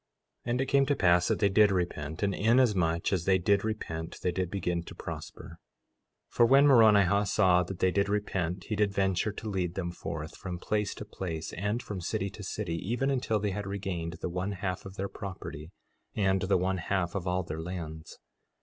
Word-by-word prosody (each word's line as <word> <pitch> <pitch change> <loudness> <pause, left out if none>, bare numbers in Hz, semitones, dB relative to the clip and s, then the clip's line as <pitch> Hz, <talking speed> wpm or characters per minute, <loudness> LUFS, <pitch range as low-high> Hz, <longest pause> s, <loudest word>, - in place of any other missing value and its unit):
4:15 - - 0
And 125 +2 +1
it - - +1
came 140 0 +3
to 145 - +2
pass 90 -5 +4
that - - +1
they 100 - +3
did 105 +1 +5
repent, 85 -3 -2
and 100 -1 +1
inasmuch 100 -8 +2
as 90 -3 0
they 95 -1 +4
did 100 +2 +2
repent 85 -7 -4
they 90 - +2
did 90 0 -2
begin 90 -3 -1
to 85 - -11
prosper. 85 0 -8 0.7
4:16 - - -26
For 120 - +6
when 140 +3 +6
Moronihah 105 -6 +5
saw 90 -4 +4
that 90 +1 -5
they 95 0 +2
did 100 +1 +1
repent 95 -3 -1
he 110 - -3
did 105 -1 +2
venture 95 +1 +1
to 110 - -7
lead 90 -4 -2
them 85 -3 -2
forth 80 -2 -6
from 90 -3 -6
place 105 +3 -1
to 105 - -7
place, 85 -6 -5
and 105 +6 -2
from 100 -5 -5
city 100 +2 -2
to 105 - -10
city, 95 -3 -3
even 120 +10 -1
until 125 -5 0
they 105 0 -1
had 100 +1 -4
regained 95 -4 -3
the - - -2
one 90 +3 -2
half 95 0 -4
of 95 - -11
their 100 0 -2
property 80 -6 -7 0.5
and 95 -2 +2
the 95 0 +2
one 95 +1 0
half 85 0 -1
of 95 -2 -3
all 90 +1 0
their 80 -1 -5
lands. 80 -2 -7
95 Hz, 210 wpm, -29 LUFS, 90-105 Hz, 0.7 s, For